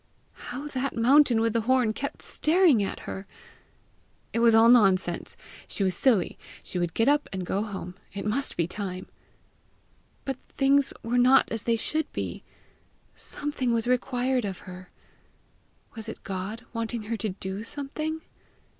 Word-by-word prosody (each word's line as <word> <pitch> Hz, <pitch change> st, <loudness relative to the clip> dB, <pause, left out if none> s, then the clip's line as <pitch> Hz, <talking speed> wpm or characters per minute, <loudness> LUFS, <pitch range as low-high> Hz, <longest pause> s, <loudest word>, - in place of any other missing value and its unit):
How 260 Hz, +4 st, -5 dB
that 270 Hz, 0 st, -2 dB
mountain 245 Hz, 0 st, +5 dB
with 225 Hz, -1 st, +1 dB
the 230 Hz, -, +2 dB
horn 245 Hz, -1 st, +2 dB
kept 280 Hz, +5 st, -5 dB
staring 320 Hz, -, +3 dB
at 195 Hz, -, -3 dB
her! 190 Hz, +1 st, -7 dB, 1.1 s
It 230 Hz, -, +1 dB
was 230 Hz, -1 st, +6 dB
all 225 Hz, +1 st, +7 dB
nonsense! 195 Hz, -7 st, +3 dB, 0.3 s
She 200 Hz, -, -2 dB
was 185 Hz, -1 st, +2 dB
silly! 235 Hz, -5 st, +2 dB, 0.2 s
She 180 Hz, -, -4 dB
would 175 Hz, -2 st, -2 dB
get 225 Hz, -, +2 dB
up 290 Hz, +1 st, +3 dB
and 190 Hz, -2 st, -4 dB
go 195 Hz, +3 st, -1 dB
home: 195 Hz, -4 st, -5 dB, 0.2 s
it 200 Hz, -, -5 dB
must 250 Hz, +7 st, -1 dB
be 170 Hz, -, +2 dB
time! 185 Hz, 0 st, -5 dB, 1.2 s
But 270 Hz, -2 st, -3 dB
things 275 Hz, 0 st, +2 dB
were 240 Hz, +2 st, +1 dB
not 255 Hz, +2 st, +5 dB
as 225 Hz, -2 st, -3 dB
they 230 Hz, -1 st, +2 dB
should 310 Hz, +7 st, -2 dB
be! -, -, -4 dB, 0.7 s
Something 265 Hz, -5 st, -3 dB
was 230 Hz, -1 st, +1 dB
required 250 Hz, 0 st, +1 dB
of 195 Hz, -3 st, -5 dB
her! 185 Hz, -1 st, -10 dB, 1.0 s
Was 225 Hz, -1 st, -7 dB
it -, -, -9 dB
God 195 Hz, +5 st, -5 dB
wanting 230 Hz, 0 st, -3 dB
her 225 Hz, +2 st, -3 dB
to 215 Hz, -, -2 dB
do 190 Hz, +1 st, -5 dB
something? 305 Hz, +6 st, -4 dB
230 Hz, 155 wpm, -27 LUFS, 200-265 Hz, 1.2 s, all